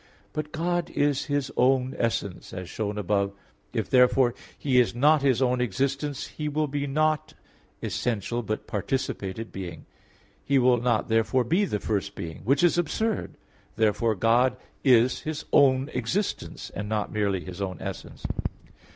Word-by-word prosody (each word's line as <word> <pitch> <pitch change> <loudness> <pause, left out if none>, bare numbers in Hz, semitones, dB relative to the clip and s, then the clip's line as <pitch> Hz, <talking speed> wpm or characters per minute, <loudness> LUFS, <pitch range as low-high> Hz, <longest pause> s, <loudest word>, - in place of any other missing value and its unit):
But 150 0 -4
God 175 +2 -1
is 145 -1 +1
His 145 -3 -1
own 130 0 +3
essence, 100 -5 -2
as 90 -1 -5
shown 105 +1 -3
above 100 0 +1
(A. - - -19 0.4
3); - - 0
if, - - -10
therefore, 125 -1 +5 0.2
He 130 -3 +3
is 120 -1 +2
not 150 +4 +5
His 135 -2 +3
own 125 -1 +2
existence 135 +5 -1
He 150 -1 -4
will 155 +1 0
be 145 0 -2
not 155 +2 0 0.5
essential, 120 +1 -1
but 110 -1 -3
participated 105 -1 -3
being. 95 -2 -7 0.6
He 140 - +2
will 125 -2 +4
not 120 -3 +1
therefore 115 +3 +2
be 175 - +2
the 105 - -2
first 100 -2 -2
being 80 -1 -6
which 140 +8 +3
is 175 0 +4
absurd. 220 +6 -1 0.4
Therefore 110 +1 +2
God 120 +5 +3 0.3
is 125 -2 +5
His 155 -1 -5
own 135 -1 +5
existence, 125 - -2
and 105 +1 -5
not 105 -1 -1
merely 100 -3 0
His 95 +1 -7
own 95 -3 -3
essence. - - -7
125 Hz, 160 wpm, -26 LUFS, 110-145 Hz, 0.6 s, therefore